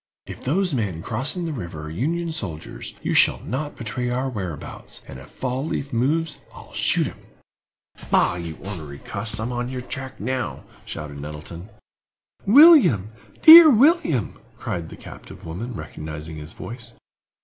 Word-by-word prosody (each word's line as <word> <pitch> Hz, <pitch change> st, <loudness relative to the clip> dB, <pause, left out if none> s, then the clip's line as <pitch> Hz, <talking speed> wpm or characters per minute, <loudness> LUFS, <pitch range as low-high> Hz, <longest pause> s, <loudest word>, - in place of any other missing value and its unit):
If -, -, -10 dB
those 180 Hz, +5 st, 0 dB
men 100 Hz, -10 st, -2 dB
crossing 135 Hz, +10 st, -1 dB
the 160 Hz, -, -3 dB
river 85 Hz, -, -6 dB
are 75 Hz, -, -6 dB
Union 165 Hz, -, -2 dB
soldiers, 85 Hz, -, -6 dB
you -, -, -1 dB
shall -, -, +4 dB
not 145 Hz, +5 st, -4 dB
betray 125 Hz, +1 st, -3 dB
our 130 Hz, +2 st, -1 dB
whereabouts, 95 Hz, -, -7 dB
and 65 Hz, -, -9 dB
if 65 Hz, -, -13 dB
Fall 130 Hz, +1 st, -3 dB
leaf 140 Hz, -3 st, -4 dB
moves 150 Hz, +7 st, 0 dB, 0.2 s
I'll -, -, -13 dB
shoot -, -, +2 dB
him!" -, -, -7 dB, 0.9 s
"Bah, -, -, +3 dB
you 85 Hz, -3 st, -6 dB
ornery 80 Hz, -8 st, -7 dB
cuss; 110 Hz, +9 st, -3 dB
I'm 115 Hz, +3 st, -3 dB
on 120 Hz, 0 st, -3 dB
your 130 Hz, -1 st, -4 dB
track 130 Hz, +1 st, -7 dB
now!" 125 Hz, +3 st, -3 dB, 0.2 s
shouted 75 Hz, -2 st, -7 dB
Nettleton. 75 Hz, +6 st, -8 dB, 0.8 s
"William—dear 275 Hz, -, +8 dB
William!" 250 Hz, -, +3 dB, 0.2 s
cried 85 Hz, -2 st, -4 dB
the -, -, -11 dB
captive -, -, -12 dB
woman, 105 Hz, +9 st, -6 dB
recognizing 75 Hz, 0 st, -7 dB
his 75 Hz, +1 st, -9 dB
voice. 115 Hz, 0 st, -9 dB
120 Hz, 150 wpm, -23 LUFS, -, 0.9 s, William—dear